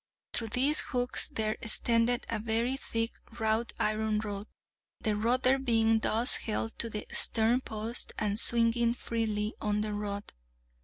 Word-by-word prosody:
Through 225 - 0
these 265 +7 +2
hooks 245 -2 -1
there 215 -1 -2
extended 230 +1 +3
a 230 - -2
very 230 +4 0
thick 230 -4 -3 0.3
wrought 220 +1 0
iron 215 0 0
rod, 205 -1 -4 0.5
the 215 -2 -1
rudder 255 +5 +2
being 225 -3 +2
thus 225 +3 +4
held 225 0 -3
to 230 - 0
the 210 -1 -5
stern 230 +3 +4
post 225 0 -3
and 210 0 0
swinging 235 0 +2
freely 220 -3 -2
on 210 -1 0
the 210 0 -3
rod. 205 -1 -5
225 Hz, 145 wpm, -30 LUFS, 215-235 Hz, 0.5 s, thus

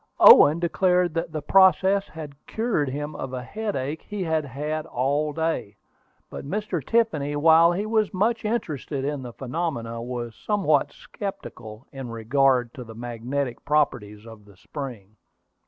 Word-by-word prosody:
Owen 150 +3 +9
declared 180 0 +1
that 165 0 -3
the 155 -2 -4
process 190 +3 +4
had 155 -3 -9
cured 220 - -1
him 145 +3 -5
of 130 -1 -6
a 125 -1 -4
headache 160 - -4
he 205 -2 -5
had 160 -2 0
had 150 +4 -4
all 145 +4 0
day; 160 -10 -2 0.5
but - - -8
Mr. 185 +1 -3
Tiffany, 155 - 0
while 160 +3 +6
he 195 +4 -2
was 215 -1 +1
much 220 +5 0
interested 155 - -3
in 145 -1 -2
the 125 -2 -7
phenomenon, 120 -4 -4
was 120 -2 -5
somewhat 185 - +1
skeptical 125 - -8
in 135 -3 -7
regard 120 +2 +1
to 125 - -8
the 115 -1 -12
magnetic 120 +2 -4
properties 120 -8 0
of 110 -2 -13
the 100 -2 -19
spring. 110 -4 -8
145 Hz, 150 wpm, -24 LUFS, 125-175 Hz, 0.5 s, Owen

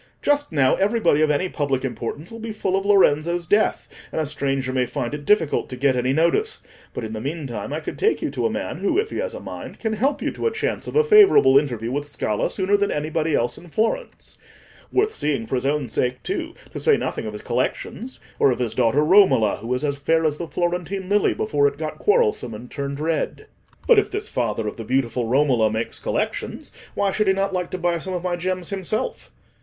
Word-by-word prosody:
"Just 290 -3 +1
now 140 -4 +3
everybody 205 -7 +2
of 155 - +3
any 150 +5 +1
public 140 -6 -1
importance 140 - -5
will 230 - -8
be 225 -1 -5
full 190 -3 -1
of 195 0 -1
Lorenzo's 170 -3 +3
death, 205 +6 +1 0.2
and - - -2
a 155 - 0
stranger 135 -3 -1
may 125 -1 +1
find 120 +1 -3
it 145 -1 -6
difficult 170 -8 +2
to 130 - -5
get 135 +1 +2
any 125 +1 +1
notice. 170 - +1 0.3
But - - -6
in 110 0 -5
the 110 - -5
meantime, 135 -6 -4
I 155 +2 -3
could - - -6
take 440 - +2
you - - -2
to - - 0
a - - -2
man - - -4
who, - - 0
if 430 +1 0
he - - -4
has - - -3
a - - -6
mind, - - -8
can 220 -1 -2
help 270 +7 0
you - - -2
to - - -2
a - - +1
chance 445 +1 -3
of - - -6
a 455 - +5
favourable 415 - +6
interview 120 -5 +1
with 145 +2 -2
Scala 105 -7 -1
sooner 195 +1 +1
than 200 0 0
anybody 155 +1 -1
else 120 +1 -1
in 175 - -14
Florence—worth 410 - -3
seeing 140 -6 -1
for 110 - -8
his 130 +1 0
own 145 -2 0
sake 125 +2 -2
too, - - -3 0.2
to - - -4
say - - +4
nothing - - -3
of 105 - -5
his 105 - -8
collections, 165 - -3 0.2
or - - +5
of 125 - +1
his 120 -3 -2
daughter 135 +6 +2
Romola, 180 - +5
who 115 - -7
is 125 +3 0
as 140 -1 -1
fair 160 +3 +2
as 150 -2 +1
the 170 - -5
Florentine 180 +3 -2
lily 205 0 +3
before 145 -9 +2
it 140 - -3
got 155 0 -5
quarrelsome 430 - +1
and 120 +3 -11
turned 140 0 -4
red." 160 - -2 0.4
"But 475 -3 +6
if - - -1
this 415 +2 -4
father 110 - -1
of - - -5
the 115 - -5
beautiful 125 -1 0
Romola 125 -3 +3
makes 110 +1 -3
collections, - - -3 0.2
why 200 -1 +1
should 215 +1 0
he 190 - +5
not 195 0 -1
like 180 -1 -2
to 185 - -4
buy 175 -1 0
some 185 +3 -4
of 175 - -4
my 180 -1 0
gems 180 0 -3
himself?" 200 - -2
155 Hz, 230 wpm, -22 LUFS, 130-200 Hz, 0.4 s, favourable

